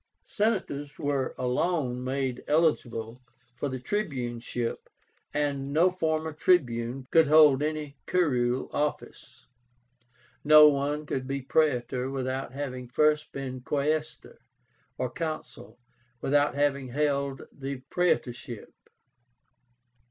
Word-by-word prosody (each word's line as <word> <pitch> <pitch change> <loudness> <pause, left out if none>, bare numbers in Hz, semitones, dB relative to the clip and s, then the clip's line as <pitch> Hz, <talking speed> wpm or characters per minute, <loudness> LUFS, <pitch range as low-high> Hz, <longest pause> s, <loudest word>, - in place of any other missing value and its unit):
Senators 185 -10 -1
were 140 -2 -1
alone 125 0 0
made 130 -1 -2
eligible 125 -7 0 0.3
for 140 - -3
the 130 - -3
tribuneship, 125 - -3 0.4
and 140 -2 -1
no 170 +5 +4
former 160 -3 -1
Tribune 130 -7 +1
could 160 -2 +5
hold 150 -2 +6
any 150 -2 -3
curule 130 -8 +1
office. 150 -4 -4 1.0
No 150 0 +9
one 145 +2 -1
could 130 -2 -3
be 140 -1 -3
Praetor 130 -3 +1
without 130 -1 -3
having 130 -2 -5
first 150 +4 +2
been 130 -2 -5
Quaestor, 150 +3 -2 0.6
or 130 - -1
Consul 155 -2 -6 0.4
without 145 +3 +2
having 140 -2 +1
held 140 0 -1
the 135 -1 -6
praetorship. 120 -9 -1
140 Hz, 100 wpm, -28 LUFS, 130-155 Hz, 1.0 s, No